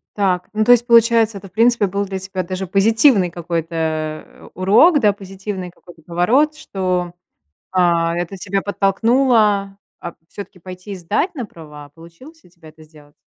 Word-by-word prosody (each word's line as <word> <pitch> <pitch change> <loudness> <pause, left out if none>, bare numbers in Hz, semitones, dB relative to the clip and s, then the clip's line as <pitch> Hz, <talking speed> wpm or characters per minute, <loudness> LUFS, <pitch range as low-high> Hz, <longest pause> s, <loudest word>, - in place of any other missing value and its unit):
Так, 185 -3 0
ну, 215 0 +1
то 245 - +4
есть, 240 0 +4
получается, 230 -3 +4
это, 195 - -13
в - - -40
принципе, 230 +1 +2
был 200 +2 -2
для 190 -1 -5
тебя 190 0 -5
даже 185 +2 -5
позитивный 210 +1 +3
какой-то, 170 -1 -5
э, 155 -1 -4
урок, 230 - +4
да, 210 -2 +4
позитивный 195 -1 -7
какой-то 175 -2 -18
поворот, 225 - +1
что, 185 - -3 0.6
а, 170 -2 +1
это 175 +2 -4
тебя 195 +1 -3
подтолкнуло, 205 -1 +1 0.2
а, 170 - -7 0.2
всё-таки 200 -2 -10
пойти 185 +3 -11
и - - -6
сдать 205 - -2
на 250 -5 -4
права. 150 -6 -13
Получилось 170 - -16
у - - -21
тебя 170 -2 -17
это 155 +1 -19
сделать? 150 -2 -19
190 Hz, 165 wpm, -18 LUFS, 170-215 Hz, 0.6 s, то